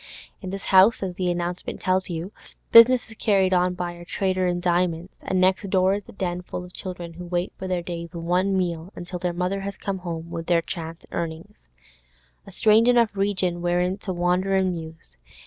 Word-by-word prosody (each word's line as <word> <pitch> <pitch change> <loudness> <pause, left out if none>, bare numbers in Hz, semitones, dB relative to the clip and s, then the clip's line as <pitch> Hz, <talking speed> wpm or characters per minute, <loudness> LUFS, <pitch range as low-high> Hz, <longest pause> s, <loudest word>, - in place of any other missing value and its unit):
In 190 - -6
this 195 +1 -6
house, 195 +3 +5
as 185 -2 -3
the 180 0 -1
announcement 175 0 -3
tells 185 0 +1
you, 170 +3 -4 0.4
business 240 +2 +8
is 220 - -13
carried 195 -3 +2
on 180 0 +2
by 175 -1 -3
a 175 0 -11
trader 185 +1 0
in 175 0 0
diamonds, 175 0 0
and 185 - -1
next 190 +2 +2
door 185 0 +3
is 200 -1 -5
a - - -8
den 180 -2 -3
full 180 0 -6
of 180 - -15
children 175 -3 -7
who 180 +2 -8
wait 175 +1 -2
for 190 - -4
their 180 -2 -1
day's 170 -1 -6
one 180 +3 +1
meal 175 -1 -2
until 180 0 -6
their 180 0 -1
mother 180 +3 -1
has 200 0 -5
come 195 -1 -3
home 170 -2 -6
with 165 0 -5
her 170 -1 +4
chance 165 0 -6
earnings. 170 +5 -6 0.8
A - - -10
strange 220 +2 +4
enough 235 -4 +4
region 185 -3 0
wherein 180 +2 0
to 190 - -5
wander 180 +2 +1
and 190 -1 +2
muse. 160 - -9
180 Hz, 200 wpm, -24 LUFS, 175-190 Hz, 0.8 s, business